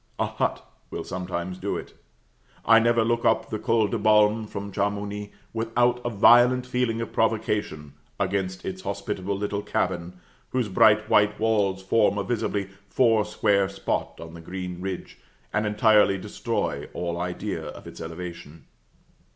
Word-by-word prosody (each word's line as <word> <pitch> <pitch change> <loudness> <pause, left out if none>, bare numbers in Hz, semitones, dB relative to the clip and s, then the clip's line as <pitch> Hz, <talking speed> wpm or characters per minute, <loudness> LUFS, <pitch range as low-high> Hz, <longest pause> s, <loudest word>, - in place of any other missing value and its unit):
A - - +1
hut - - -2 0.2
will - - -5
sometimes 90 0 -4
do - - -2
it; - - -9 0.7
I 115 0 +7
never 115 0 +3
look 115 +1 0
up 110 - +3
to - - -21
the 110 - -2
Col 110 0 +2
de 115 +2 -2
Balme 105 +1 +4
from 100 0 -6
Chamouni, 100 +1 -2 0.2
without 120 +2 +1
a 120 - -1
violent 120 +3 +5
feeling 125 -2 -1
of 115 - -5
provocation 105 -9 -1 0.3
against 95 -1 -2
its 185 0 -5
hospitable 100 - -3
little 100 0 -2
cabin, 90 -3 -2 0.4
whose 125 -4 -1
bright 105 +3 +4
white 105 0 +3
walls 100 -4 +1
form 105 0 +2
a 100 - 0
visibly 105 -4 -2 0.2
four 115 -4 +3
square 100 -1 +1
spot 95 0 -3
on 80 0 -9
the 85 - -10
green 90 +1 -6
ridge, 95 -1 -6 0.3
and 105 0 +1
entirely 105 -1 +4
destroy 95 - -3
all 85 0 -3
idea 90 0 -3
of - - -9
its - - -10
elevation. 80 -3 -8
105 Hz, 155 wpm, -25 LUFS, 95-115 Hz, 0.7 s, I